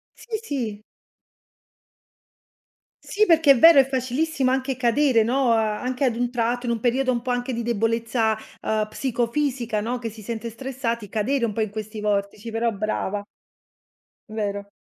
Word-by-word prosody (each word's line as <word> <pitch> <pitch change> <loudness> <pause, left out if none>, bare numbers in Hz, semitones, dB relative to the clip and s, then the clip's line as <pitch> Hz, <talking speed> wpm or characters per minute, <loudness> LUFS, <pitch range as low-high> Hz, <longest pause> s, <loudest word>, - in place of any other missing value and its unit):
Sì, 450 -2 -5
sì. 230 - -4 2.2
Sì 425 +1 +2
perché 320 -5 +5
è 255 - +5
vero, 330 -2 +9
è 265 - +5
facilissimo 265 +2 0
anche 265 -1 -1
cadere, 245 -1 +3
no, 255 +2 +1
uhm, - - +5
anche 250 +5 -1
ad 235 -3 +1
un 245 0 -1
tratto, 245 +1 -1
in - - +1
un 230 - -1
periodo 255 +2 +1
un 240 -1 -1
po' 250 0 -3
anche 245 +1 -1
di 235 -1 -2
debolezza, 225 0 0 0.2
uhm, 215 -1 0
psicofisica, 240 -2 -1
no, 240 +3 -2
che 230 -1 -4
si 220 0 -12
sente 230 +2 -5
stressati, 235 -3 -4
cadere 235 +5 0
un 225 - +1
po' 225 - -5
in 215 -2 0
questi 215 +1 -6
vortici; 205 +1 -2
però 225 +1 0
brava. 205 -1 -2 1.1
Vero. 200 -2 -4
235 Hz, 160 wpm, -23 LUFS, 220-260 Hz, 2.2 s, vero